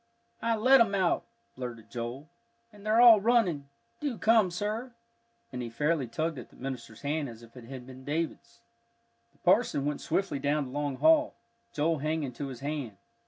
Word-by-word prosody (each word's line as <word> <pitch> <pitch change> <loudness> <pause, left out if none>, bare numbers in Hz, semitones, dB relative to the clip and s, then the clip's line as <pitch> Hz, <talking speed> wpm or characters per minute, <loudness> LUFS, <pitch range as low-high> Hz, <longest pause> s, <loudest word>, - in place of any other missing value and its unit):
"I 230 0 +1
let 255 +4 +6
'em 200 -3 +3
out," 185 -3 +1 0.3
blurted 120 -3 -7
Joel, 120 +5 -5 0.5
"and 205 -1 -15
they're 215 +2 +3
all 235 -4 +9
running. 195 - +2 0.3
Do 280 -6 -3
come, 220 -3 +4
sir." 215 +7 -3 0.6
And 125 - -4
he 120 - -4
fairly 145 +3 0
tugged 155 +4 -2
at - - -10
the - - -21
minister's 125 -4 -7
hand 145 -1 -1
as 115 0 -11
if 115 +1 -16
it 125 -2 -11
had 130 0 -9
been 130 0 -12
David's. 160 +4 -4 0.7
The - - -31
parson 140 - +3
went 150 0 -2
swiftly 165 -4 -1
down 145 +1 +1
the 125 - -9
long 145 0 -2
hall, 315 - +4 0.4
Joel 155 +1 0
hanging 155 -2 -2
to 140 +3 -5
his 130 -3 -8
hand. 140 -8 -4
150 Hz, 180 wpm, -29 LUFS, 130-205 Hz, 0.7 s, all